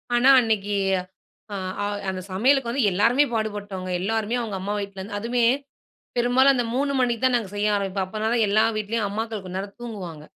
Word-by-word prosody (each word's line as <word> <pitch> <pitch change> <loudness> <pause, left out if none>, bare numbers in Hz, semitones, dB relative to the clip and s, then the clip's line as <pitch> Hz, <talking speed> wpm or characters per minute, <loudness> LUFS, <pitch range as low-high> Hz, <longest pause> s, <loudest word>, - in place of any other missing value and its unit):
ஆனா 245 +3 +5
அன்னக்கி 210 -4 0 0.8
அ, - - -2 0.3
அ - - 0 0.2
அந்த 185 -1 -4
சமையலுக்கு 245 +5 +2
வந்து 265 -1 0
எல்லாருமே 230 +9 +4
பாடுபட்டோங்க. 205 -4 -3
எல்லாருமே 220 +3 -1
அவுங்க 210 -5 -4
அம்மா 205 +2 -2
வீட்ல 200 -1 -6
இருந்து 205 +2 -5
அதுமே 240 +2 0 0.7
பெரும்பாலும் 250 +3 +4
அந்த 245 -2 0
3 280 +2 +1
மணிக்கு 240 -1 0
தான் 255 -1 +4
நாங்க 215 -5 -3
செய்ய 205 +1 +1
ஆரம்பிப்போம். 195 -1 -2
அப்பதான் 220 +3 0
எல்லா 215 +2 +4
வீட்டிலேயும் 215 +1 -1
அம்மாக்கள் 220 0 -4
கொஞ்ச 185 0 -6
நேரம் 200 +1 -7
தூங்குவாங்க. 180 -10 -7
215 Hz, 175 wpm, -24 LUFS, 200-240 Hz, 0.8 s, ஆனா